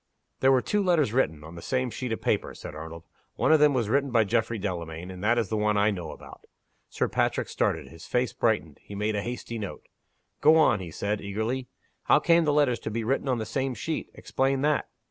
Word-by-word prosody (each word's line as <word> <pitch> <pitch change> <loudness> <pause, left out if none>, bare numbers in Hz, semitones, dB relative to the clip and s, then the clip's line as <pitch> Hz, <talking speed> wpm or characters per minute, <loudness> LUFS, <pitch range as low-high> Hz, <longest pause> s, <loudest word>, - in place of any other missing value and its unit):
"There 135 - +5
were 130 -2 +3
two 210 - +1
letters 170 - +2
written, 80 - +1
on 80 +1 -10
the 85 - -9
same 130 +2 -1
sheet 125 0 -4
of 110 - -3
paper," - - 0
said - - -8
Arnold. 80 +2 -8 0.3
"One - - +2
of 160 - +6
them 150 -2 +5
was 120 -4 +1
written 140 +5 +1
by 115 -3 +4
Geoffrey 115 +2 0
Delamayn 90 -3 -5
and 90 +1 -9
that 115 +3 +3
is 115 -4 0
the 110 - -1
one 105 0 +1
I 105 +1 +3
know 90 -5 -5
about." - - -12 0.4
Sir - - 0
Patrick - - 0
started. - - -1
His 80 +1 -12
face 125 -3 0
brightened; 95 -10 0
he 100 - -10
made 105 +1 -1
a 105 - 0
hasty 120 0 -5
note. 100 -3 -6 0.6
"Go 155 +2 +7
on," 135 -9 +4
he 90 -3 -6
said, 100 +5 -2
eagerly. 110 +6 -3 0.4
"How - - +6
came 170 -1 +4
the 150 - +3
letters 145 -5 +2
to - - -5
be 115 +1 -2
written 135 +4 0
on 125 - +2
the 110 - -3
same 130 +3 -2
sheet? 160 +4 -4
Explain 135 0 0
that!" 150 0 +1
115 Hz, 230 wpm, -27 LUFS, 100-135 Hz, 0.6 s, Go